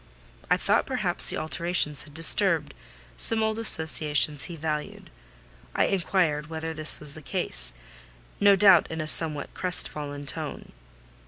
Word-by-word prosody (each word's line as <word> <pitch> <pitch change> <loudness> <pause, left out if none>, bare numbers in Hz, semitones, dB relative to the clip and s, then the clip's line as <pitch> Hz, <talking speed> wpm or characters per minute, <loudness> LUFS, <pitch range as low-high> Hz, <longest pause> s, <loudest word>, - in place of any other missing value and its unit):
I - - +2
thought - - -1
perhaps - - +4
the - - 0
alterations 160 -2 -2
had 145 -1 -18
disturbed 165 -3 +3 0.4
some 220 - -1
old 220 0 -3
associations 155 -7 +2
he 170 - -9
valued. 155 -1 -6 0.6
I - - +1
inquired 170 -5 -2
whether 160 0 -7
this 155 -1 +7
was 150 -2 -4
the 155 - -13
case: 135 - -4 0.7
no 200 -1 +4
doubt 190 -3 +4
in 160 - -7
a 155 - -4
somewhat 155 -2 -1
crest 180 -2 -1
fallen 145 -1 -9
tone. 150 0 -7
160 Hz, 145 wpm, -24 LUFS, 150-180 Hz, 0.7 s, this